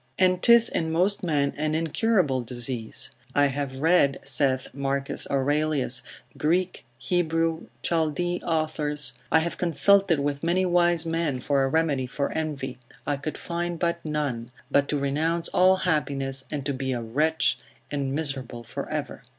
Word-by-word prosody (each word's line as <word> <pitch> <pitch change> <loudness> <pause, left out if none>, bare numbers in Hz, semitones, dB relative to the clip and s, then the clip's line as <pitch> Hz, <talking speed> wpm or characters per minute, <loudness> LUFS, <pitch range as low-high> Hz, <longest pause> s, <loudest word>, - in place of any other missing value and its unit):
And 185 -1 +3
'tis 235 0 +7
in 160 -1 -1
most 185 +5 +1
men 145 -5 0
an 155 +1 0
incurable 165 - +1
disease. 120 -1 -4 0.2
I 145 - +5
have 140 -1 -3
read, 160 -4 +4
saith 135 -1 0
Marcus 140 0 -2
Aurelius, 140 -1 +1 0.4
Greek, 180 +4 0
Hebrew, 165 +3 0 0.2
Chaldee 170 +2 0
authors; 155 -3 -1 0.2
I - - +6
have 170 +1 -3
consulted 180 0 +4
with 140 0 -1
many 175 +3 +1
wise 175 -2 +3
men 165 -5 -1
for 135 +2 +1
a - - +2
remedy 145 -4 +1
for 140 +3 -2
envy, 140 -5 -4 0.3
I 145 - 0
could 145 +2 -5
find 175 0 -3 0.2
none, 145 -7 -2 0.2
but 140 0 +3
to 150 - +1
renounce 155 +5 0
all 185 +1 +5
happiness, 140 -7 -1
and 140 -2 -4
to 140 - -1
be 130 0 -2
a 120 - -3
wretch, 150 +8 +1 0.3
and 140 -2 -2
miserable 135 -5 -3
for - - -6
ever. - - -4
150 Hz, 150 wpm, -26 LUFS, 135-165 Hz, 0.4 s, tis